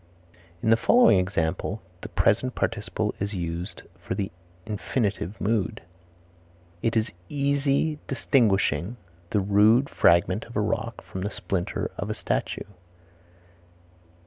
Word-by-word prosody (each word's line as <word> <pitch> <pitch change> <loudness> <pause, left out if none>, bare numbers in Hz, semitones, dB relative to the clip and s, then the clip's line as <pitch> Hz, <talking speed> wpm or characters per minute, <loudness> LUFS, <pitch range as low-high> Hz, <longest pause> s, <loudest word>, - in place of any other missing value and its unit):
In 110 - +3
the 115 - +6
following 235 - +6
example 90 +2 -1 0.2
the - - -7
present 130 0 +2
participle 110 -1 -1
is 100 +1 -2
used 85 0 -4 0.2
for - - -4
the 100 -1 -2 0.3
infinitive 105 -2 -2
mood: 105 -4 0 1.0
"It 115 0 +1
is 110 +2 +1 0.2
easy 140 +1 +1
distinguishing 105 - +2 0.3
the 105 - +1
rude 105 +7 +4
fragment 90 +3 +3
of 120 - -13
a - - +2
rock 110 +2 -2
from 95 - -7
the 100 - -1
splinter 95 -4 -3
of - - -3
a - - -2
statue." - - -2
105 Hz, 120 wpm, -26 LUFS, 95-120 Hz, 1.0 s, the